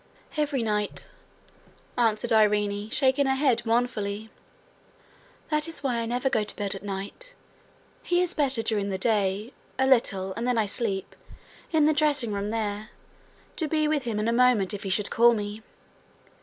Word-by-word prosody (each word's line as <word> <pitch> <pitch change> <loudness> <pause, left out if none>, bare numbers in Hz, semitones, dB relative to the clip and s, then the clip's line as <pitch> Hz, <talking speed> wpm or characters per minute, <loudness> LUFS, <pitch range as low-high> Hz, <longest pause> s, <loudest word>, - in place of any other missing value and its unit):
'Every 290 -5 0
night,' 210 -2 -2 0.8
answered 230 -1 +1
Irene, 210 -1 +2
shaking 265 +2 +2
her 265 - +2
head 265 -4 +2
mournfully. 220 -3 -1 1.2
'That 300 +1 +1
is 325 -3 -2
why 250 -3 0
I 230 - -2
never 245 +3 -1
go 235 -5 +1
to 210 - -7
bed 205 -2 -2
at 195 - -8
night. 205 - -7 0.7
He 350 - +1
is 360 -1 +2
better 270 -6 0
during 205 -3 0
the 190 - -2
day 205 +1 0 0.2
a 265 - +2
little, 195 -7 +2
and 230 +5 -3
then 250 -1 +1
I 220 - +2
sleep 200 -2 -2 0.6
in 315 -3 +4
the 310 - +4
dressing 290 -7 +1
room 200 +1 -2
there, 215 -1 -3 0.7
to 320 - 0
be 310 0 +1
with 300 -1 +1
him 225 -3 -2
in 215 +1 0
a 230 - +2
moment 235 -5 +3
if 205 - -5
he 195 - -4
should 200 +2 0
call 235 +1 +5
me. 210 0 -5
230 Hz, 170 wpm, -26 LUFS, 205-265 Hz, 1.2 s, call